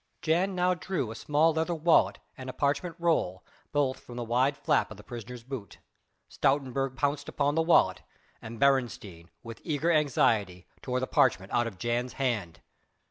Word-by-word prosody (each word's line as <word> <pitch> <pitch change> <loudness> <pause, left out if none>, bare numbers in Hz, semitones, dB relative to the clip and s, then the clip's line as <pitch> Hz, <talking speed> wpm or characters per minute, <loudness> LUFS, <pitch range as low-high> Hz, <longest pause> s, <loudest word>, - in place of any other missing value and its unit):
Jan 180 +4 +1
now 180 0 +2
drew 175 - -3
a - - -7
small 150 +7 +2
leather 160 +2 -1
wallet 165 +1 +3 0.2
and 130 0 -8
a - - -5
parchment 150 +4 -1
roll 160 - 0 0.3
both 140 -3 0
from 120 - -12
the 120 - -3
wide 125 +5 +1
flap - - +1
of 110 - -10
the 105 - -13
prisoner's 120 +1 -8
boot. 125 -6 -7 0.5
Stoutenburg 135 -1 0
pounced 145 0 -1
upon 145 0 0
the 165 - +2
wallet, 160 - +3 0.4
and 115 0 -8
Beresteyn 115 -11 0
with 115 -1 -9
eager 155 +2 0
anxiety 115 - +1 0.2
tore 125 -1 -2
the 130 - -1
parchment 105 -7 +2
out 120 0 +1
of 105 -5 -8
Jan's 120 +4 -2
hand. 110 -11 -2
130 Hz, 170 wpm, -28 LUFS, 115-150 Hz, 0.5 s, wallet